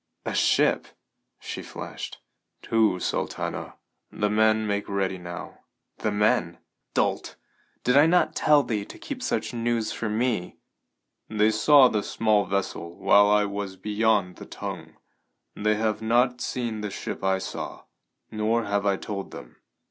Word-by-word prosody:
"A - - -2
ship?" - - +2 0.5
she - - -6
flashed. - - -8 0.4
"Two, 110 -5 +2
Sultana. - - -3 0.4
The 105 0 -1
men 110 0 +3
make 100 -1 -2
ready 95 -2 -1
now." 85 0 -8 0.4
"The 110 - 0
men? 105 +1 +1 0.4
Dolt! - - 0 0.5
Did 125 - +2
I 145 +3 +7
not 180 +2 +3
tell 150 -2 +4
thee 105 -5 -2
to - - -11
keep 270 -3 -7
such 255 - -2
news 115 -1 -1
for 110 - -3
me?" 110 -4 -1 0.7
"They 110 0 +3
saw 135 +5 +6
the 110 -4 0
small 105 -1 +1
vessel 95 -3 -3
while 100 +1 +5
I 105 0 +4
was 100 -1 -4
beyond 105 -1 0
the - - -10
Tongue. - - -7 0.6
They 105 +1 +1
have 110 0 -1
not 125 +2 +2
seen 115 -4 -3
the 105 - -3
ship - - -6
I 95 0 +2
saw, 95 - -6 0.5
nor 110 +2 0
have 100 0 0
I 100 -1 +2
told 100 -1 -5
them. - - -11
105 Hz, 150 wpm, -26 LUFS, 100-115 Hz, 0.7 s, I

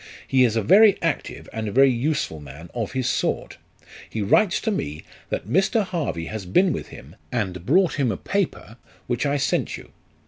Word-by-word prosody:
He 130 -1 +4
is 115 -3 +2
a 115 - +1
very 205 - +6
active - - -2
and 110 -1 -3
very 135 +4 +5
useful 125 - -1
man 75 +4 -11
of 115 -3 -3
his 130 -2 -1
sort. - - -1 0.5
He 110 - -3
writes 180 - +3
to 220 - 0
me, 75 - -4 0.3
that - - -3
Mr. 195 - +2
Harvey 165 - -3
has 105 0 -6
been 180 - +3
with - - -5
him, 70 +8 -13 0.2
and 95 -7 -3
brought 175 +1 +3
him 130 -5 +2
a 95 - -3
paper, 185 - -3 0.3
which 120 +3 -1
I 140 +1 +1
sent 140 - -1
you. - - -14
125 Hz, 185 wpm, -23 LUFS, -, 0.5 s, very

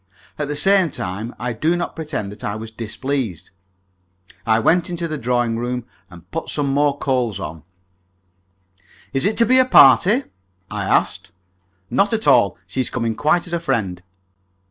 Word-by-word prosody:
At 150 - -1
the 145 - -3
same 190 +3 +4
time, 110 -1 -5
I 120 0 -3
do 160 +10 0
not 175 - -4
pretend 150 -11 -4
that 105 - -12
I 105 - -3
was 110 +1 -7
displeased. 115 - -4 1.0
I 110 -1 +4
went 165 +10 +2
into 170 -1 -3
the 155 -2 -4
drawing 120 -1 0
room 125 0 -3 0.2
and 90 0 -15
put 165 - -4
some 145 -2 -1
more 145 0 +2
coal 125 -8 -1
on. 80 -2 -7 1.5
"Is 135 0 +1
it 210 - +1
to 230 - +5
be 255 +3 +4
a 255 - +5
party?" 205 - +6 0.5
I - - -3
asked. 95 - 0 0.6
"Not 200 +2 +2
at 220 - -3
all. 100 -2 +4
She 115 +8 -3
is 125 - -3
coming 115 -2 -2
quite 155 +8 +1
as 175 - -7
a 170 - 0
friend." 110 - -2
130 Hz, 170 wpm, -20 LUFS, 110-165 Hz, 1.5 s, party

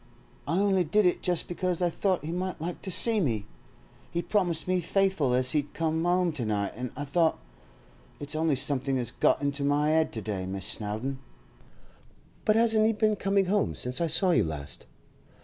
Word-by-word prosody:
'I 165 +4 0
only 195 -2 +2
did 200 +6 +2
it 180 - +1
just 175 -2 +1
because 180 0 -2
I 175 -1 +1
thought 185 -3 -1
he 160 - -4
might 180 +1 -4
like 170 +3 -5
to 195 - -4
see 220 +4 +5
me. 115 - -1 0.6
He 170 0 -3
promised 175 -6 +1
me 185 0 +1
faithful 190 -8 +1
as 130 0 +2
he'd 145 -1 -2
come 160 0 -1
'ome 180 -1 +2
to 145 -6 -4
night, 105 -2 -2
and 125 +1 -5
I 145 - -4
thought—it's 135 - -4
only 155 -2 +1
somethink 135 0 +1
as 120 -2 -3
got - - +1
into 140 0 -1
my 145 +2 +2
'ed 160 0 +2
to 110 - -3
day, 95 -4 -4
Miss 95 0 -4
Snowdon.' 110 +6 -3 1.3
'But 215 - +3
hasn't 220 -1 +3
he 225 - +2
been 215 0 +1
coming 195 -1 +1
home 200 +2 0
since 125 +5 -1
I 170 - +1
saw 180 +4 +2
you - - +3
last? 70 -3 -6
160 Hz, 190 wpm, -27 LUFS, 130-185 Hz, 1.3 s, see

